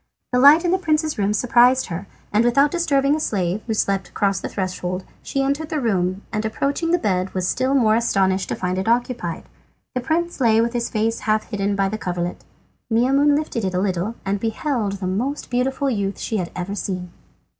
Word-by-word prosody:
The 250 - +4
light 295 +6 +7
in 345 - +2
the 375 - +2
prince's 310 - 0
room 200 0 +2
surprised 245 +4 +4
her, 180 +3 -6 0.3
and 215 +2 +4
without 275 +4 +3
disturbing 285 -5 +2
the 310 - 0
slave, 195 - -1
who 220 - -1
slept 195 -2 0
across 195 -2 0
the - - -5
threshold, 185 -1 -3 0.2
she 275 - -1
entered 285 +3 -1
the 310 - -1
room, 190 -5 0
and 215 0 -1
approaching 275 +9 -1
the 350 - +4
bed 190 - -1
was 185 -1 0
still 260 +5 +1
more 225 -5 +4
astonished 195 -5 +1
to - - -1
find 180 0 -2
it 190 - -3
occupied. 235 -6 -1 0.5
The 250 - -1
prince 330 +3 -1
lay 225 -2 +4
with 230 +1 +1
his 240 -1 -1
face 225 +1 0
half 215 +1 -1
hidden 200 -1 0
by 195 -1 +1
the 215 +2 -4
coverlet. 175 -1 -3 0.5
Maimoune 275 +5 +4
lifted 300 -7 -3
it 185 -1 -1
a - - +2
little 190 +3 -1
and 195 +1 -1
beheld 225 -1 -1
the 195 -1 -5
most 245 +12 -2
beautiful 260 +3 0
youth 200 -6 -1
she 220 - -2
had 175 -3 -2
ever 180 +2 -4
seen. 185 -3 -4
220 Hz, 205 wpm, -21 LUFS, 195-270 Hz, 0.5 s, light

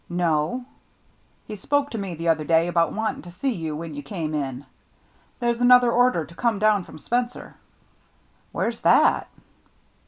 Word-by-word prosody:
" - - -39 0.2
No." 160 +10 0 0.4
" - - -38
He 215 - -6
spoke 285 +8 -1
to 230 - -4
me 190 -3 -5
the 165 +1 -5
other 160 -1 +2
day 165 +2 +2
about 170 -1 +1
wanting 220 0 -3
to 175 - -12
see 220 +10 -2
you 160 -8 -4
when 160 0 -6
you 145 - -6
came 155 +1 -5
in. 140 -2 -4 0.7
There's 240 -1 -1
another 245 -1 +6
order 245 -9 +2
to 170 - -15
come 225 +5 0
down 210 -2 +2
from - - -12
Spencer." 240 - -3 1.0
"Where's - - -2
that?" - - +4
175 Hz, 175 wpm, -24 LUFS, 160-240 Hz, 1.0 s, another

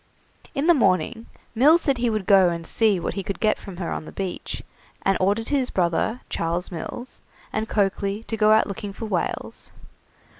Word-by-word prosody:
In 280 +1 0
the 345 - +7
morning 210 - +1 0.3
Mills 300 +9 +5
said 275 -4 +1
he 240 0 +2
would 215 -3 -1
go 195 -2 +6
and 170 -1 -4
see 210 +1 +2
what - - -3
he 200 - -3
could 195 0 -5
get 215 -1 +2
from 195 -4 -9
her 175 -2 -3
on - - -4
the - - -9
beach, 190 -2 -5 0.4
and 195 - +3
ordered 205 +4 +1
his 270 -3 +1
brother, 180 +7 0
Charles 170 +3 -2
Mills, 185 +9 -6 0.3
and 220 0 -2
Coakley 200 +1 0
to 225 - -3
go 215 -1 +4
out 220 - +5
looking 200 0 -6
for 225 - -6
whales. 190 -6 -3
205 Hz, 190 wpm, -24 LUFS, 185-225 Hz, 0.4 s, the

